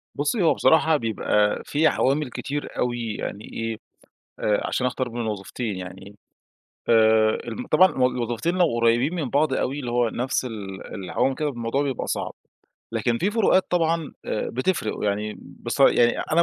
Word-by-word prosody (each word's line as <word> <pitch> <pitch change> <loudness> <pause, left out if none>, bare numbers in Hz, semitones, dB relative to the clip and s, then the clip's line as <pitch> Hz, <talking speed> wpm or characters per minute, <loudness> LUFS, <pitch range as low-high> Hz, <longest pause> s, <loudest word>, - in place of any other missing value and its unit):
بُصّي، 150 +9 0
هو 160 - +5
بصراحة 160 -1 +4
بيبقى 105 -2 +1
فيه 155 +2 +3
عوامل 140 +1 +1
كتير 145 +4 -5
أوي، 120 -3 -1
يعني 105 +2 -5
إيه، 115 -1 -3 0.6
آآ، 105 -1 +1
عشان 125 - 0
أختار 125 0 -2
بين 120 0 -5
الوظيفتين، 105 0 -3
يعني. 95 +2 -9 0.7
آآ، 110 -1 +5 0.2
ال 250 - -4
م - - -8
طبعًا 185 - +6
ال 125 -1 +1
وظيفتين 120 +8 -1
لو 180 - +5
قريّبين 120 +6 +3
من 155 -7 -2
بعْض 145 +1 +2
أوي، 135 +2 -1
اللي 125 -4 -4
هو 120 -1 +2
نَفس 130 +3 -1
ال 100 -5 -7
العوامل 105 +7 -1
كده، 150 +1 -1
الموضوع 120 +1 -2
بيبقى 135 -3 -3
صعب. - - -2 0.6
لكن 115 +1 0
فيه 190 - +1
فروقات 210 -3 +3
طبعًا، 165 -3 0
آآ، 110 - -2
بتفرِق، 130 - -1
يعني 105 +1 -1
بص - - -7
يعني 120 0 +5
أنا - - -2
120 Hz, 170 wpm, -24 LUFS, 110-145 Hz, 0.7 s, طبعًا